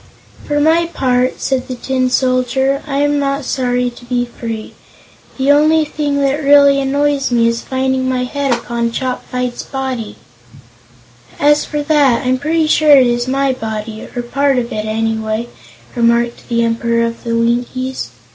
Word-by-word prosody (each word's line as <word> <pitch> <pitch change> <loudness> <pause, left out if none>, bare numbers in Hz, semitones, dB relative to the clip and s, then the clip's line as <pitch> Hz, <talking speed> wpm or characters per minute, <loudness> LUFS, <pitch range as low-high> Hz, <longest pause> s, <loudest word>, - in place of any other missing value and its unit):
"For 290 0 0
my 325 +3 +3
part," 255 -5 0
said 260 -1 -1
the 255 - -4
Tin 255 +1 -1
Soldier, 260 +2 +1
"I 280 -1 -1
am 290 0 +1
not 275 0 -1
sorry 250 -1 0
to 240 - -15
be 245 0 -1
free. 230 -2 -7 0.6
The 270 +1 +3
only 310 +2 +4
thing 290 -1 -2
that 280 +2 0
really 280 0 +6
annoys 280 +1 0
me 235 -2 +3
is 230 0 -1
finding 260 0 -1
my 255 -1 0
head 280 +1 -2
upon 235 -1 -1
Chopfyt's 250 -1 -3
body." 260 -5 -5 1.2
"As 295 +1 +3
for 295 -1 -3
that, 285 -5 +2
I'm 255 0 +1
pretty 315 +3 +1
sure 305 -1 +5
it 260 - +5
is 240 0 0
my 270 0 +1
body, 220 -2 -5
or 245 - -1
a - - -10
part 275 +2 +1
of 240 0 -2
it, 215 0 -3
anyway," 220 +1 -2 0.5
remarked 235 0 +1
the 235 -1 +1
Emperor 230 0 0
of 230 0 -5
the 230 -1 -1
Winkies. 245 +3 -1
255 Hz, 165 wpm, -16 LUFS, 235-280 Hz, 1.2 s, really